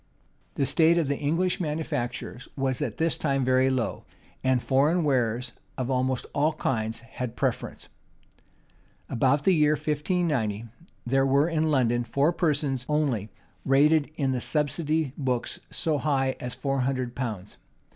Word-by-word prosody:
The 140 - +1
state 165 +4 +4
of 165 -4 +1
the 140 0 0
English 165 +5 0
manufactures 150 -6 -3
was 135 -2 -1
at - - -3
this 165 0 0
time 135 -3 +1
very 130 +1 +3
low; 125 -5 -1 0.4
and 130 -1 +3
foreign 145 +8 +2
wares 125 -4 0 0.3
of 130 0 -2
almost 130 0 0
all 150 +2 +2
kinds 115 -6 -2
had 125 +1 -5
the 115 - -18
preference.[*] 130 -3 -2 1.2
About 135 +3 +2
the 190 - +4
year 150 -2 +4
1590, 150 - -1 0.4
there 135 +2 +2
were 140 +3 +3
in 160 -2 +1
London 120 -4 +2
four 140 +8 +1
persons 145 -6 0
only 135 -9 0 0.3
rated 145 +3 +4
in 135 -4 0
the 125 -2 -1
subsidy 150 0 0
books 125 -3 -2
so 155 -3 -1
high 135 -3 +1
as 125 -1 -5
four 135 -1 -1
hundred 130 -2 -1
pounds. 110 -7 -5
135 Hz, 145 wpm, -26 LUFS, 125-150 Hz, 1.2 s, state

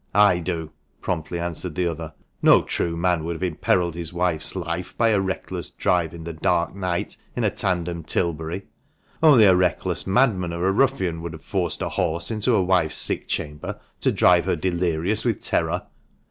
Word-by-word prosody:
"I 100 -4 +5
do!" 85 -2 -4 0.3
promptly 85 0 -3
answered 85 -1 -4
the 90 - 0
other. 80 -2 -4 0.3
"No - - +6
true 85 -1 -2
man 85 -2 +1
would 85 +1 -3
have 80 - -6
imperilled 90 0 +1
his 85 -1 -5
wife's 85 -2 -1
life 90 0 -4
by 115 -1 +3
a 105 -3 +3
reckless 95 -1 -4
drive 85 -3 0
in 85 - -9
the 85 0 -5
dark 85 +1 0
night 90 -3 -2 0.2
in - - -1
a - - +2
tandem 85 -2 -2
Tilbury! 85 +3 -2 0.6
Only 145 -8 +7
a 95 -3 +7
reckless 90 0 0
madman 95 -6 +2
or 85 +2 -2
a - - +4
ruffian 95 -9 +1
would 85 -1 -6
have 80 - -11
forced 90 -7 -2
a - - -2
horse 85 +6 -1
into 110 +2 +1
a 95 - +3
wife's 90 -4 +1
sick - - 0
chamber, 75 0 -4 0.2
to - - +2
drive - - +4
her - - +1
delirious 90 +3 0
with 115 -4 0
terror!" - - 0
85 Hz, 185 wpm, -23 LUFS, 85-95 Hz, 0.6 s, Only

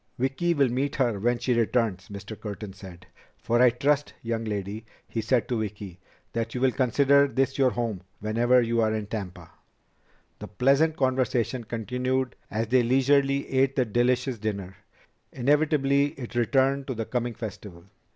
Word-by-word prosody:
"Vicki 135 +7 0
will 140 -3 +3
meet 135 +4 -1
her 120 -7 0
when 120 +4 +1
she 125 +1 0
returns," 115 -5 0
Mr. 100 +1 -8
Curtin 105 -2 -7
said. 95 -2 -12 0.3
"For 120 +1 +1
I 125 - +7
trust, 140 +4 0
young 115 -1 -2
lady," 105 0 -4 0.2
he 115 - -3
said 120 +2 +1
to 120 -3 -1
Vicki, 100 -4 -6 0.3
"that 115 +1 -3
you 125 - -2
will 130 -1 +4
consider 140 +2 +3
this 135 0 -1
your 130 -2 +5
home 115 -6 -3 0.2
whenever 120 +4 +3
you 115 0 +1
are 110 0 +1
in 110 -1 -3
Tampa." 95 -5 -7 0.9
The - - -7
pleasant 140 +9 +2
conversation 130 -2 0
continued 125 +3 -2
as 110 +2 -1
they 130 +1 +4
leisurely 135 +3 +2
ate 135 0 +1
the 130 - +2
delicious 120 +2 0
dinner. 100 -3 -4 0.6
Inevitably 145 +1 +2
it 120 -3 -7
returned 135 +3 +1
to 130 - -3
the 115 0 -3
coming 120 -1 -2
festival. 100 -6 -8
120 Hz, 160 wpm, -26 LUFS, 110-135 Hz, 0.9 s, I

